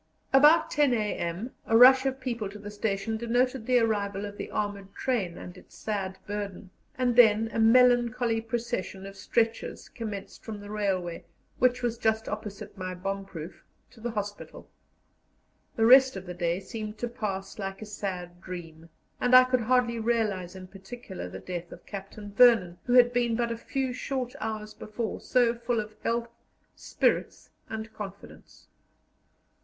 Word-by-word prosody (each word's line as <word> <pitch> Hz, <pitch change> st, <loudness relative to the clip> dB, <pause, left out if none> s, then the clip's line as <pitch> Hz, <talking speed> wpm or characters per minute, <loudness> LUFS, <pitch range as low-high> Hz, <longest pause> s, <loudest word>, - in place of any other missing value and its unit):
About 300 Hz, +5 st, +6 dB
10 290 Hz, -4 st, +3 dB
a.m. 210 Hz, 0 st, -2 dB, 0.2 s
a 225 Hz, -, +5 dB
rush 260 Hz, +2 st, +8 dB
of 265 Hz, 0 st, -2 dB
people 235 Hz, -6 st, -3 dB
to 205 Hz, -, -10 dB
the 205 Hz, 0 st, -8 dB
station 210 Hz, +1 st, -2 dB
denoted 245 Hz, +1 st, 0 dB
the 250 Hz, -1 st, +4 dB
arrival 205 Hz, -3 st, 0 dB
of 205 Hz, 0 st, -7 dB
the -, -, -6 dB
armoured 200 Hz, -2 st, -4 dB
train 205 Hz, -10 st, -1 dB
and 180 Hz, -, -9 dB
its 185 Hz, -, -16 dB
sad 195 Hz, -3 st, -3 dB
burden, 200 Hz, -2 st, -5 dB, 0.3 s
and 250 Hz, -2 st, +1 dB
then 225 Hz, -1 st, +5 dB
a -, -, -1 dB
melancholy 240 Hz, 0 st, +4 dB
procession 225 Hz, -4 st, -4 dB
of 195 Hz, 0 st, -9 dB
stretchers 225 Hz, +3 st, -1 dB
commenced 210 Hz, -4 st, -7 dB
from 215 Hz, -2 st, -6 dB
the 205 Hz, 0 st, -9 dB
railway, 190 Hz, -5 st, -2 dB, 0.4 s
which 250 Hz, 0 st, +2 dB
was 235 Hz, -1 st, -1 dB
just 220 Hz, -1 st, +1 dB
opposite 210 Hz, -1 st, -6 dB
my 185 Hz, -2 st, -5 dB
bomb 195 Hz, +2 st, -3 dB
proof, 165 Hz, -2 st, -9 dB, 0.3 s
to 225 Hz, -, -17 dB
the 240 Hz, -, -2 dB
hospital. 205 Hz, -2 st, -6 dB, 1.1 s
The 225 Hz, -, +2 dB
rest 260 Hz, +2 st, +7 dB
of 190 Hz, -1 st, -6 dB
the 180 Hz, -, -6 dB
day 175 Hz, 0 st, -1 dB
seemed 215 Hz, +2 st, -7 dB
to 240 Hz, -, -2 dB
pass 210 Hz, -4 st, -5 dB
like 195 Hz, -1 st, -4 dB
a 215 Hz, -, -7 dB
sad 180 Hz, -4 st, -6 dB
dream, 165 Hz, -3 st, -9 dB, 0.3 s
and 250 Hz, 0 st, +4 dB
I 255 Hz, -, +10 dB
could 255 Hz, -1 st, +1 dB
hardly 240 Hz, 0 st, +2 dB
realize 215 Hz, -6 st, -1 dB
in 185 Hz, 0 st, -8 dB
particular 195 Hz, +1 st, -9 dB
the -, -, -7 dB
death 175 Hz, -1 st, -6 dB
of -, -, -12 dB
Captain 205 Hz, +1 st, -8 dB
Vernon, 215 Hz, -7 st, +5 dB
who 245 Hz, -, 0 dB
had 245 Hz, -1 st, +6 dB
been 240 Hz, -1 st, +1 dB
but 235 Hz, 0 st, 0 dB
a -, -, -1 dB
few 260 Hz, +2 st, -3 dB
short 255 Hz, -1 st, -3 dB
hours 215 Hz, -1 st, -4 dB
before 215 Hz, +1 st, -5 dB
so 245 Hz, -2 st, +3 dB
full 235 Hz, 0 st, -1 dB
of 215 Hz, 0 st, -6 dB
health, 235 Hz, 0 st, -1 dB, 0.5 s
spirits, -, -, -1 dB, 0.2 s
and 220 Hz, 0 st, -6 dB
confidence. 200 Hz, -1 st, -10 dB
220 Hz, 165 wpm, -28 LUFS, 195-240 Hz, 1.1 s, I